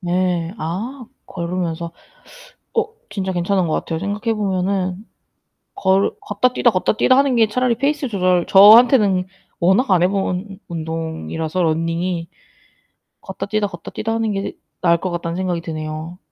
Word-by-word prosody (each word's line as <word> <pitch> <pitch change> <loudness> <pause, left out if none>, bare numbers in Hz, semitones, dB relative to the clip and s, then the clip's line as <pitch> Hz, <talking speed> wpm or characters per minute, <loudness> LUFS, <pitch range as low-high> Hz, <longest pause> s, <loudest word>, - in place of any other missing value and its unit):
네. 175 -1 0
아 220 - -4 0.2
걸으면서. 170 -1 -4 0.8
어 455 -1 +2 0.2
진짜 190 -2 -3
괜찮은 180 +1 0
것 155 - -1
같아요. 160 -1 -2
생각해 205 +5 -2
보면은 190 -1 -1 0.7
걸 190 +1 +2
걷다 225 +5 0
뛰다, 240 -1 +3
걷다 185 -3 +1
뛰다 255 - +4
하는 275 -2 +3
게 225 -2 +4
차라리 250 +2 +1
페이스 280 +2 0
조절 185 -4 +1
저한테는 210 -1 +7 0.3
워낙 190 +9 +3
안 180 -2 +4
해 - - +5
본 195 0 -3
운동이라서 160 +1 -3
런닝이 165 +1 -1 0.9
걷다 190 0 -6
뛰다, 210 0 0
걷다 175 -4 -10
뛰다 225 +1 -3
하는 225 -1 0
게 195 0 -3 0.3
나을 170 -1 +4
것 180 +1 -4
같다는 170 -1 -3
생각이 180 -2 -2
드네요. 155 +1 -6
185 Hz, 300 characters per minute, -20 LUFS, 170-210 Hz, 0.9 s, 저한테는